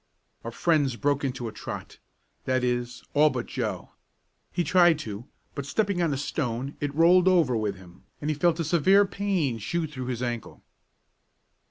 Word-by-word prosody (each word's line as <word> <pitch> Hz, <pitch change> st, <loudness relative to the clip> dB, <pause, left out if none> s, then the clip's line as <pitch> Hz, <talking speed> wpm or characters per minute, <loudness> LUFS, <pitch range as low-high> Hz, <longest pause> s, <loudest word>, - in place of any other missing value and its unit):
Our 115 Hz, -, -4 dB
friends 145 Hz, 0 st, +1 dB
broke 145 Hz, +2 st, 0 dB
into 125 Hz, -3 st, -3 dB
a -, -, -5 dB
trot -, -, -8 dB, 0.5 s
that 130 Hz, -1 st, +1 dB
is, 125 Hz, 0 st, -2 dB
all 150 Hz, +1 st, +5 dB
but 125 Hz, -4 st, -3 dB
Joe. -, -, -4 dB, 0.6 s
He 175 Hz, -, 0 dB
tried 175 Hz, -2 st, +5 dB
to, 105 Hz, +2 st, -7 dB, 0.3 s
but 140 Hz, -1 st, -5 dB
stepping 200 Hz, +2 st, 0 dB
on 165 Hz, -3 st, +1 dB
a 140 Hz, -, -1 dB
stone 135 Hz, -1 st, -3 dB
it 145 Hz, -1 st, -3 dB
rolled 175 Hz, +3 st, +5 dB
over 170 Hz, -9 st, +4 dB
with 105 Hz, -3 st, -1 dB
him, 90 Hz, -2 st, -16 dB
and 150 Hz, +1 st, -1 dB
he -, -, -1 dB
felt 170 Hz, +2 st, +2 dB
a -, -, +1 dB
severe 185 Hz, +6 st, +4 dB
pain 190 Hz, -, -1 dB
shoot 160 Hz, +8 st, -2 dB
through 130 Hz, -3 st, -6 dB
his 125 Hz, -1 st, -3 dB
ankle. 120 Hz, -2 st, -5 dB
140 Hz, 175 wpm, -26 LUFS, 125-170 Hz, 0.6 s, all